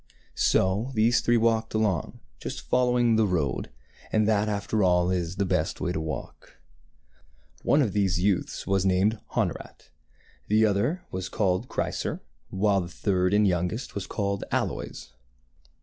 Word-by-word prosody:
So 100 +7 +2
these 115 +3 +3
three 120 0 +3
walked 110 -1 +1
along, 105 -8 -1 0.2
just - - -5
following 125 -2 +3
the 110 -1 +3
road; 80 -8 -1 0.4
and 110 -1 +2
that, 105 -1 +2
after 105 +1 -1
all, 90 -1 +3
is 90 -1 -2
the 100 0 0
best - - -1
way 90 - -1
to 80 - -2
walk. 75 -4 -7 1.0
One 145 0 +3
of 110 - -2
these 95 -3 +1
youths 95 0 0
was 95 0 +1
named 95 +3 +2 0.2
Honorat, - - -3 0.6
the 110 +1 +4
other 115 - 0
was 95 0 -4
called 100 +1 0
Chrysor, - - -2 0.3
while 100 0 +2
the 85 - -5
third 90 +1 0
and 105 0 +4
youngest 90 +6 -1
was 100 -2 -5
called 100 -2 -2
Aloys. - - -3
100 Hz, 150 wpm, -26 LUFS, 90-110 Hz, 1.0 s, the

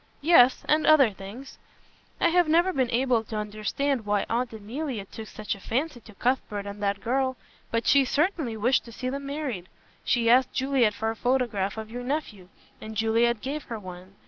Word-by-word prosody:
"Yes, 265 -6 +6
and 305 +1 +3
other 290 -7 +6
things. 205 +8 -10 0.6
I 340 - +4
have 350 0 +3
never 345 +4 +3
been 260 -3 +1
able 245 -1 +2
to 220 - -7
understand 215 +5 -2
why 205 -1 0
Aunt 240 +1 0
Emilia 225 +1 -5
took 220 +2 -9
such 210 -1 -4
a 200 - -9
fancy 255 +7 -2
to 220 -2 -16
Cuthbert 220 -4 -1
and 200 0 -7
that 200 -1 -1
girl. 260 +1 0 0.3
But 230 0 -1
she 280 0 +5
certainly 285 - 0
wished 245 +5 +2
to 235 - -11
see 255 +2 -4
them 280 0 -5
married. 275 - -4 0.3
She 235 -2 +1
asked 250 +2 +4
Juliet 260 -5 +2
for 220 0 -1
a - - -7
photograph 235 -5 0
of 220 0 -6
your 245 +1 -5
nephew, 245 - -4 0.3
and 220 0 -7
Juliet 225 +1 +2
gave 290 +2 -4
her 230 - -5
one. 185 -1 -11
240 Hz, 190 wpm, -26 LUFS, 215-270 Hz, 0.6 s, Yes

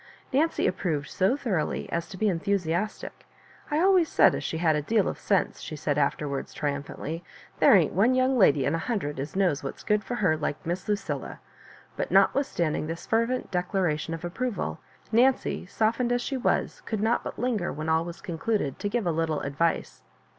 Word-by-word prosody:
Nancy 315 +5 +2
approved 160 -6 -1
so 195 +9 +1
thoroughly 195 - -1
as 170 0 -2
to 190 - -9
be 215 - +1
enthusiastic. 185 +1 -2 0.4
"I 300 0 +1
always 370 -2 +4
said - - +5
as - - -3
she 160 - -3
had 160 -2 +2
a 150 - 0
deal 210 +6 +1
of - - -3
sense," 195 -2 0
she 155 - -6
said 145 0 -1
afterwards, 140 -1 -1
triumphantly. 145 +3 -4 0.3
'^ - - -26
There - - +7
ain^t - - +4
one 235 +6 +3
young 255 +1 +3
lady 145 - +4
in - - +1
a 165 - 0
hundred 160 - -2
as 145 +6 -5
knows 180 -8 +1
what's 135 - -6
good 210 -1 +1
for 245 - -4
her, 185 -9 +2
like 150 -1 -3
Miss 175 +2 -3
Lucilla." 205 0 -3 0.6
But - - -2
notwithstanding 170 - +2
this 165 +1 -5
fervent 230 +3 0
declaration 180 -4 -1
of 165 +1 -7
approval, 225 +6 -3 0.3
Nancy, 245 -4 +2
softened 230 +5 0
as 245 0 +1
she 275 - -3
was, 255 - 0
could 220 -3 -2
not 225 +2 +2
but - - -6
linger, 230 -8 -1
when 155 +2 -5
all 160 0 +2
was 170 0 -8
concluded, 175 - -2
to 205 - -2
give 230 -1 -1
a 170 - +2
little 160 -1 -1
advice. 150 +4 -1
180 Hz, 190 wpm, -27 LUFS, 160-230 Hz, 0.6 s, There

